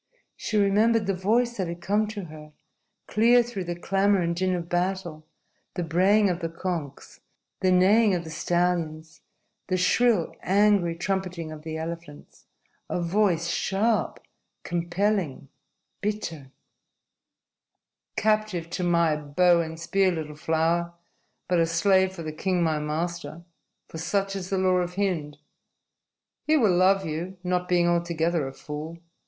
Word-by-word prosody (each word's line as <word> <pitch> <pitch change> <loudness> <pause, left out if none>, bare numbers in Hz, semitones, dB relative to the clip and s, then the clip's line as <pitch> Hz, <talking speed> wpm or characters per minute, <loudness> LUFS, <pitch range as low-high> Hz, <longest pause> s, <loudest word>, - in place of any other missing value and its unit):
She 215 - -2
remembered 210 +2 +3
the 195 - 0
voice 235 +6 +1
that 190 -3 -1
had 170 +1 -6
come 210 +4 +1
to 210 -2 -6
her, 150 -1 -12 0.5
clear 240 +3 +4
through 210 -6 -5
the 175 0 -3
clamor 195 +3 +2
and 170 0 -1
din 185 +1 0
of 170 -1 -4
battle, 175 -3 -2 0.5
the 180 - -2
braying 190 +6 +3
of 175 -2 -1
the 165 -2 -3
conches, 165 -5 -5 0.4
the 185 - +2
neighing 195 +3 +4
of 175 - -3
the 160 - -9
stallions, 165 -1 -1 0.5
the 185 - 0
shrill, 210 0 +2
angry 195 -3 +3
trumpeting 180 -2 -3
of 155 -1 -9
the 160 0 -5
elephants 165 -2 -8 0.4
A - - -1
voice 175 -1 +1
sharp, 205 +5 0 0.5
compelling, 175 -4 -1 0.5
bitter 170 -10 -4 1.6
"Captive 215 -6 0
to 180 - -3
my 170 -3 +3
bow 170 +4 +3
and 160 0 -6
spear, 190 +3 +2
little 155 -3 -5
flower, 165 +2 0 0.5
but 180 -1 +2
a 165 - +3
slave 190 +3 +3
for 170 -3 -7
the 155 - -4
king, 180 +2 0
my 160 -2 +1
master. 160 +1 -4 0.4
For 160 - -8
such 195 +4 -1
is 185 -2 -5
the 195 - 0
law 185 -1 +3
of 180 0 -2
Hind. 170 -7 -2 1.1
He 310 0 +4
will 210 -10 +3
love 190 +2 +3
you 170 +5 -4
not 180 0 -1
being 175 -1 +3
altogether 170 -3 0
a 135 - -7
fool. 155 +3 -7
175 Hz, 145 wpm, -26 LUFS, 165-195 Hz, 1.6 s, clear